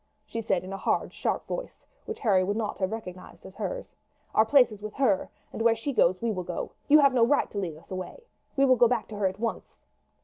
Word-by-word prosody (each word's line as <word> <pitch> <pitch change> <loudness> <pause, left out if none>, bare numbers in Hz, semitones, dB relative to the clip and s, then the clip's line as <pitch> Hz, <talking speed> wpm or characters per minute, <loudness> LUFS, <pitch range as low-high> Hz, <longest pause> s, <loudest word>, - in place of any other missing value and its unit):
she 230 - -4
said 190 -5 0
in 190 +1 -7
a - - -4
hard - - -1
sharp - - -2
voice - - -6 0.2
which 445 - -6
Harry 195 -6 +3
would 205 +3 -1
not 220 -2 -3
have 185 0 0
recognized 185 -5 -8
as - - -10
hers. - - -5 0.4
"Our 220 - +5
place 255 -2 +5
is 210 -1 -10
with 215 0 -7
her, 230 -9 +2 0.2
and - - -4
where 230 0 +4
she 250 +5 -4
goes 185 -6 +3
we 230 -1 -1
will 185 -3 -3
go. 175 -1 -5 0.2
You 295 - +8
have 280 -3 +5
no 245 -2 +4
right 270 +5 +2
to 205 - -3
lead 170 -6 -4
us 160 - -19
away. 185 - -6 0.3
We 275 - +4
will 255 -1 +5
go 240 - +6
back 235 -2 -1
to 215 - -7
her 200 -2 +2
at 190 +1 -4
once." 230 0 -4
220 Hz, 250 wpm, -27 LUFS, 190-255 Hz, 0.4 s, You